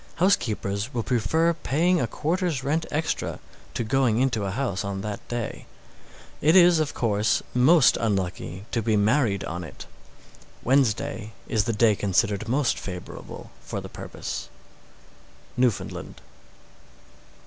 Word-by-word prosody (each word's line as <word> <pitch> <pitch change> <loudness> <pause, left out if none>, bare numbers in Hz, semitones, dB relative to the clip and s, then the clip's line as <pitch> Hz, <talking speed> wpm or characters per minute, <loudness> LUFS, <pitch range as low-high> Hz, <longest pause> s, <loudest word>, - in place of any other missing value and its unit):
Housekeepers 120 - 0
will 115 - 0
prefer 160 +8 +2
paying 170 +3 +1
a 120 - 0
quarter's 160 - -1
rent 155 +4 0
extra 155 +2 -2 0.4
to - - 0
going 120 -1 +2
into 120 -6 +1
a - - -1
house 105 -2 -2
on 100 -1 -3
that 105 0 -4
day. 120 -2 -4 0.7
It 155 +4 +4
is, 175 -2 +7
of 155 -2 -1
course, 110 -1 +1
most 135 +3 +5
unlucky 95 -2 -2
to 115 - 0
be 110 -1 +1
married 105 -1 +2
on 85 +2 -4
it. 80 - -10 0.8
Wednesday 130 -2 +1
is 110 -2 +1
the 115 - 0
day 110 0 +4
considered 100 +2 0
most 135 +1 +1
favorable 90 -2 -8
for - - -4
the - - -8
purpose. - - -6 1.1
_Newfoundland. 125 -4 -1
120 Hz, 130 wpm, -25 LUFS, 105-145 Hz, 1.1 s, is